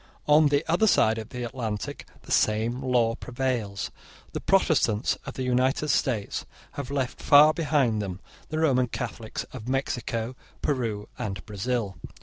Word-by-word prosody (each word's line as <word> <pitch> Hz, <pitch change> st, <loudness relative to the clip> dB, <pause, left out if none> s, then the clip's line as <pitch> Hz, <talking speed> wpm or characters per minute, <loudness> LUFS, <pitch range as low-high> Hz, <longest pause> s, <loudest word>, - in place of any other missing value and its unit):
On 150 Hz, +1 st, +6 dB
the 145 Hz, +2 st, +1 dB
other 180 Hz, +6 st, +3 dB
side 110 Hz, -, +4 dB
of 110 Hz, -, -7 dB
the 125 Hz, -1 st, -5 dB
Atlantic 115 Hz, -3 st, -4 dB, 0.2 s
the -, -, -11 dB
same 110 Hz, +4 st, +2 dB
law 125 Hz, -3 st, +2 dB
prevails. 120 Hz, -5 st, -3 dB, 0.4 s
The -, -, -2 dB
Protestants 105 Hz, +3 st, +2 dB
of -, -, -6 dB
the 130 Hz, -, -3 dB
United 130 Hz, +4 st, +1 dB
States 120 Hz, -6 st, 0 dB, 0.3 s
have 140 Hz, -2 st, -6 dB
left 135 Hz, -3 st, -2 dB
far 150 Hz, +2 st, +7 dB
behind 140 Hz, -9 st, +1 dB
them 95 Hz, -3 st, -5 dB, 0.3 s
the 155 Hz, -, -3 dB
Roman 130 Hz, -6 st, +3 dB
Catholics 115 Hz, -2 st, -5 dB
of 120 Hz, -3 st, -8 dB
Mexico, 125 Hz, -3 st, -2 dB, 0.3 s
Peru, 115 Hz, -8 st, -1 dB
and 95 Hz, -4 st, -4 dB
Brazil. 105 Hz, 0 st, -2 dB
125 Hz, 145 wpm, -26 LUFS, 110-135 Hz, 0.4 s, far